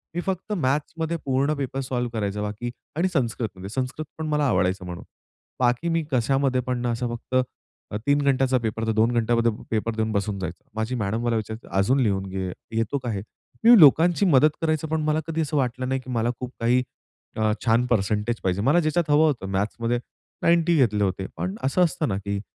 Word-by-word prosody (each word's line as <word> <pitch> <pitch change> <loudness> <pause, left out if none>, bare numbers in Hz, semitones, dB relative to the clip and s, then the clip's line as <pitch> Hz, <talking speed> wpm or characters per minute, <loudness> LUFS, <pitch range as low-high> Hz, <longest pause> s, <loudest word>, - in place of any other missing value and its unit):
मी 175 - 0
फक्त 190 +3 -3
मॅथ्समध्ये 160 +2 -1
पूर्ण 140 +2 +1
पेपर 135 -1 -3
सॉल्व्ह 125 -2 -2
करायचं, 105 0 -2
बाकी 105 +3 -4 0.2
आणि 170 +4 +2
संस्कृतमध्ये. 110 - -2
संस्कृतपण 140 +6 -4
मला 150 -1 +1
आवडायचं 95 -2 +1
म्हणून. 90 -1 -7 0.6
बाकी 125 +6 +1
मी 165 -1 +1
कशामध्ये 130 +1 +2
पण, 125 -1 -3
असं 120 +1 -1
फक्त 125 +2 -6 0.6
अ, 105 - -2
3 145 0 +4
घंट्याचा 135 -2 +2
पेपर, 115 -1 -2
तर - - +2
2 110 +2 +3
घंट्यामध्ये 115 0 +2 0.2
पेपर 110 0 -1
देऊन 110 0 -1
बसून 100 -1 -1
जायचं. 90 -2 -6
माझी 110 +3 -2
मॅडम 110 +1 -1
मला 120 -1 +1
विचारायची, 110 +1 -5
"अजून 125 +8 +3
लिहून 100 -5 +1
घे, 95 0 -3 0.3
येतो 115 +5 0
का 120 - -2
हे?" 100 - -3 0.4
मी 235 +1 +9
लोकांची 165 +6 +6
मदत 155 -3 +5
करायचं, 155 -1 0
पण 160 0 -1
मला 155 0 +1
कधी 165 0 -1
असं 150 0 -1
वाटलं 130 -1 -1
नाही, 130 0 0
की 130 - -12
मला 115 0 +1
खूप 125 -1 -5
काही 120 +2 +3 0.6
अ, 110 -1 +2
छान 115 +2 +3
परसेंटेज 110 +1 0
पाहिजे. 95 +1 0
मला 145 +9 +4
ज्याच्यात 155 0 0
हवं 150 +2 +5
होतं. 135 -9 -1
मॅथ्समध्ये 115 +5 -1 0.4
90 170 0 +4
घेतले 105 -7 +3
होते. 95 0 -1
पण 90 +4 -3
असं 135 +7 +1
असतं 160 -2 0
ना, 95 - -1
की 100 0 -3
125 Hz, 190 wpm, -24 LUFS, 110-145 Hz, 0.6 s, मी